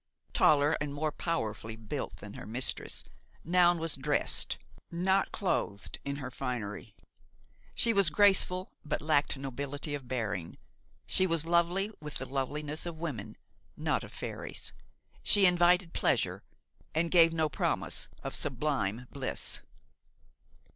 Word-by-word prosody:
Taller 150 +1 +5
and 145 -1 -3
more 155 +1 0
powerfully 115 -9 -2
built 110 -2 -5
than - - -9
her - - -8
mistress, 120 +4 0 0.4
Noun 175 +1 +4
was 165 -1 -2
dressed, 145 +2 +1 0.3
not 190 +3 +1
clothed 100 - -2
in 140 0 -3
her 130 -3 -6
finery. 110 -6 -4 0.8
She 230 - +3
was 200 -5 +5
graceful 185 +1 +4
but 150 - -2
lacked 145 -2 +2
nobility 140 +2 -4
of 140 -3 -5
bearing; 105 -9 -3 0.5
she 185 0 +2
was 165 -2 +1
lovely 175 +4 +2
with 150 -1 -6
the 130 - -3
loveliness 145 +4 -2
of 165 -2 -6
women, 150 -11 -5 0.4
not - - 0
of - - -10
fairies; - - -6 0.5
she 195 - +6
invited 180 0 +4
pleasure - - +1 0.5
and 165 +1 +1
gave 165 -2 +7
no 160 -1 +1
promise 150 - -1
of - - -4
sublime 125 -5 -1
bliss. 135 -2 -3
150 Hz, 130 wpm, -31 LUFS, 130-170 Hz, 0.8 s, gave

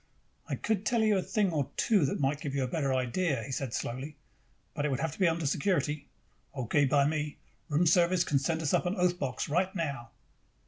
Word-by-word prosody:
"I - - 0
could 215 -3 -1
tell 230 +1 +2
you 215 -1 +4
a 190 - +2
thing 200 0 0
or 145 -4 -1
two 205 -9 +3
that - - -2
might 145 +1 0
give 140 -1 -4
you 135 - +1
a - - -1
better 140 0 -1
idea," 130 +1 0
he 135 - -7
said 130 -2 -3
slowly. 130 +7 -4 0.6
"But 145 - -2
it 150 - +1
would 135 -1 -1
have 160 +1 -1
to 155 - -12
be 185 - +4
under 165 -1 0
security." 150 -1 0 0.5
"Okay 135 +3 +2
by 140 +1 +3
me. 150 0 -2 0.3
Room 155 +4 +2
service 175 +1 +4
can 140 - +1
send 160 +4 -1
us 145 - 0
up - - +2
an 180 - -1
oath 180 -2 +1
box 130 -3 -2
right 185 +6 0
now." 140 -9 -3
150 Hz, 225 wpm, -30 LUFS, 140-180 Hz, 0.6 s, you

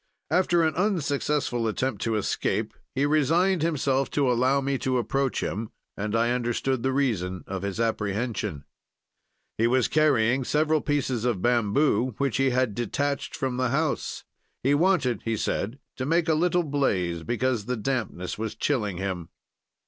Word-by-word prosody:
"After 175 -2 +3
an 160 -1 +2
unsuccessful 145 - 0
attempt 110 0 -2
to 115 -1 0
escape, 105 - -1 0.2
he 140 - +2
resigned 165 +5 +3
himself 140 -4 +1
to 135 -3 +3
allow 130 +3 +3
me 135 -1 -1
to 130 -1 0
approach 135 +2 0
him, 110 +2 -3 0.3
and 105 +2 -2
I 115 +1 +2
understood 125 +1 0
the 130 - +1
reason 105 -10 -1
of 95 -1 -4
his 100 +1 -4
apprehension: 105 - -2 0.9
"He 115 - +4
was 125 0 +3
carrying 135 -5 +3
several 155 +3 +2
pieces 135 -5 -1
of 120 -7 0
bamboo 120 +1 +2
which 140 -5 0
he 135 0 +3
had 125 -3 +1
detached 140 +5 -2
from 130 -4 -2
the 130 -1 +1
house. 150 +3 -1 0.4
He 135 +3 +3
wanted, 145 - +2
he 115 -1 -1
said, 110 +4 -2 0.2
to 130 - -2
make 165 +2 +2
a 160 - +4
little 175 +2 +2
blaze 95 - 0
because 120 +1 -1
the 125 +1 -2
dampness 110 -7 -3
was 110 -1 -3
chilling 105 -10 -1
him. 90 -3 -4
130 Hz, 155 wpm, -26 LUFS, 110-145 Hz, 0.9 s, He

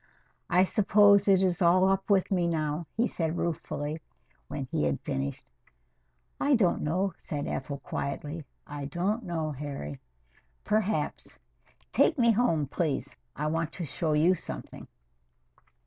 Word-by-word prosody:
"I 180 +1 +5
suppose 200 +1 +5
it 190 -1 +5
is 180 -1 +1
all 185 +2 +5
up 195 +1 0
with 195 -2 +3
me 180 -3 +2
now," 155 -1 -1
he 235 - +3
said 165 -5 -2
ruefully, 155 -2 -3 0.5
when 140 -2 -4
he 75 - +1
had 70 -2 0
finished. 70 +1 -3 0.9
"I 280 -1 +4
don't 195 -7 +2
know," 180 +5 0
said 145 -2 -4
Ethel 140 +1 -3
quietly. 145 +3 -4 0.2
"I 145 -1 -6
don't 190 - -1
know, 165 -4 -2
Harry. 140 - -6 0.6
Perhaps. 210 -7 -1 0.5
Take - - +3
me 235 -2 +5
home, 200 -10 +2
please. 145 -1 -2 0.2
I 150 - -3
want 160 +1 -1
to 175 - -4
show 155 +2 -1
you 160 +5 +4
something." 65 - -7
170 Hz, 140 wpm, -29 LUFS, 145-190 Hz, 0.9 s, I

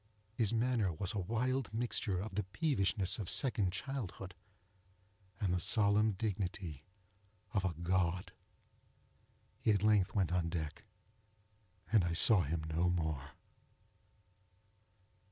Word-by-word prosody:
His 110 -3 +1
manner 115 -4 +1
was 90 +6 -3
a 105 - -2
wild 120 +6 -1
mixture 110 -4 -1
of 100 +2 -5
the 105 - 0
peevishness 100 - -1
of 100 - -2
second 105 -8 +1
childhood, 100 -4 -5 1.1
and 95 -4 0
the 90 - +1
solemn 105 +3 +3
dignity 95 -6 -4 0.7
of 95 - +1
a 90 -4 -1
God. 90 +1 -1 1.3
He - - 0
at 105 -2 +3
length 105 -3 +3
went 95 -4 +1
on 90 -2 0
deck, 80 -3 -5 1.1
and 110 -5 +5
I 85 -1 -1
saw 95 +4 +7
him 80 +1 -2
no 80 +3 0
more. 80 -5 -2
95 Hz, 120 wpm, -35 LUFS, 85-110 Hz, 1.3 s, saw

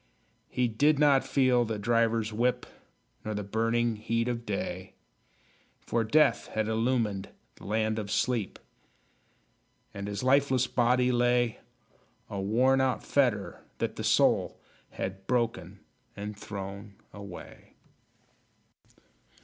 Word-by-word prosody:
He 125 -1 +1
did 145 +7 +2
not 140 -2 +4
feel 130 -3 +3
the 110 -2 -3
driver's 115 0 +1
whip, 120 +3 0 0.6
Nor 110 0 -4
the 105 - -3
burning 115 +2 0
heat 115 +2 -1
of 120 -1 -3
day; 95 -2 -4 0.9
For 115 -1 0
Death 150 +7 +3
had 110 -1 0
illumined 110 -3 0 0.3
the - - -13
Land 110 +1 0
of 105 -2 -5
Sleep, 115 -1 -1 1.4
And 100 0 -6
his 100 +1 -4
lifeless 130 -1 +3
body 125 +1 +2
lay 120 -1 +2 0.7
A 100 -1 -3
worn 125 +7 +3
out 130 -1 0
fetter, 120 -8 0 0.2
that - - -2
the - - -5
soul - - +2 0.3
Had 95 0 -6
broken 105 -6 -1 0.4
and 105 +1 -5
thrown 100 0 -7 0.2
away! 100 -3 -11
115 Hz, 115 wpm, -29 LUFS, 105-125 Hz, 1.4 s, not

